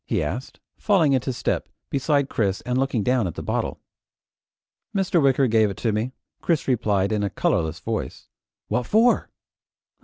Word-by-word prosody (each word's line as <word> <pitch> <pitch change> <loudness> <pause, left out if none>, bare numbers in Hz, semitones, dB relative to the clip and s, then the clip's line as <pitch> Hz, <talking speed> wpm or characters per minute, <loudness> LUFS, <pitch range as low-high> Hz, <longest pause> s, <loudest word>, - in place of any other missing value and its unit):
he - - 0
asked, 95 - -5 0.2
falling 170 -9 +3
into 130 0 0
step 120 - -2 0.2
beside 140 0 +1
Chris 100 -7 -1
and 125 +1 -2
looking 135 -5 0
down 125 -4 +2
at 85 - -6
the - - -6
bottle. - - -2 1.2
"Mr. 185 -3 +2
Wicker 135 0 +4
gave 110 -3 +3
it 100 - -6
to 115 - 0
me," 110 +4 -1 0.3
Chris 165 -4 0
replied 105 -6 +1
in 105 -1 0
a 100 - 0
colorless 80 -3 0
voice. - - -4 0.4
"What 120 +3 -1
for?" 230 +3 +3
125 Hz, 160 wpm, -24 LUFS, 105-140 Hz, 1.2 s, Wicker